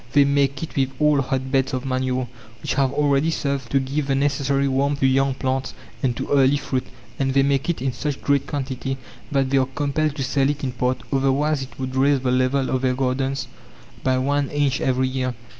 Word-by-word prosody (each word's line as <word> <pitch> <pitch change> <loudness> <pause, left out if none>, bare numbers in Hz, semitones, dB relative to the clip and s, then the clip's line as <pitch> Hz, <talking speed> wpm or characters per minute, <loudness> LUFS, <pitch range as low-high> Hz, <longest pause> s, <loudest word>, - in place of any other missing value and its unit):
They 145 -1 +6
make 140 +1 +1
it 165 - -7
with 135 -1 +2
old 150 -3 +3
hot 130 0 -2
beds 135 -1 +1
of 130 +1 -4
manure, 130 -1 -1 0.4
which - - -1
have 135 -1 +2
already 145 +1 +2
served 140 -5 -2
to 135 - +3
give 135 +2 -2
the 135 - +1
necessary 140 0 +1
warmth 140 +2 +1
to - - +4
young 135 0 +2
plants 130 0 -2 0.3
and 125 -3 0
to - - -3
early 140 0 +4
fruit; 130 -2 -3 0.3
and 135 -1 0
they 135 - +5
make 140 +2 +1
it 160 -7 -1
in 135 -2 0
such 140 +4 -3
great 140 -1 +1
quantity 135 -1 -3 0.3
that 135 -2 +1
they 135 - +4
are 130 - +1
compelled 150 0 0
to 140 - -2
sell 135 +1 +1
it 145 0 -3
in 130 - -1
part, 125 +1 -1
otherwise 135 +2 +2
it 135 - -8
would 130 0 -4
raise 135 0 +3
the 125 -1 0
level 130 +1 +1
of 130 - 0
their 130 -1 +1
gardens 135 +1 -1 0.6
by 130 -1 +2
one 140 +2 0
inch 145 -2 0
every 130 0 +1
year. 130 -1 -2
135 Hz, 215 wpm, -22 LUFS, 130-140 Hz, 0.6 s, They